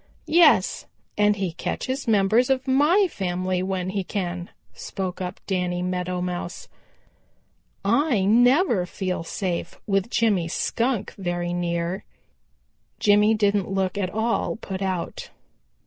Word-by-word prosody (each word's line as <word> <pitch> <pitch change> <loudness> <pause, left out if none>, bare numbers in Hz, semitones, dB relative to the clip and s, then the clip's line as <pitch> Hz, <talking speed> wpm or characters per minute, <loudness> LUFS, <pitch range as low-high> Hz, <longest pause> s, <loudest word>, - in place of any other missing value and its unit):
"Yes, 340 +2 +4 0.3
and 210 0 +3
he 190 -3 -2
catches 260 - -4
members 220 +3 +3
of 265 0 0
my 300 +10 +4
family 185 - -2
when 185 -1 -2
he 195 0 -2
can," 180 -2 -4 0.2
spoke 185 -1 -5
up 180 -1 -5
Danny 180 -2 -1
Meadow 180 0 -2
Mouse. 180 0 -4 1.2
"I 235 -2 +2
never 240 - +4
feel 185 -2 -3
safe 170 0 -4
with 195 +1 0
Jimmy 210 -8 +2
Skunk 230 +5 -1
very 175 -1 -2
near." 170 +1 -2 0.9
Jimmy 210 +1 +4
didn't 205 -3 +1
look 190 -1 -1
at 195 -3 -1
all 220 +4 -1
put 195 -3 -6
out. 185 -3 -3
195 Hz, 120 wpm, -24 LUFS, 180-225 Hz, 1.2 s, Yes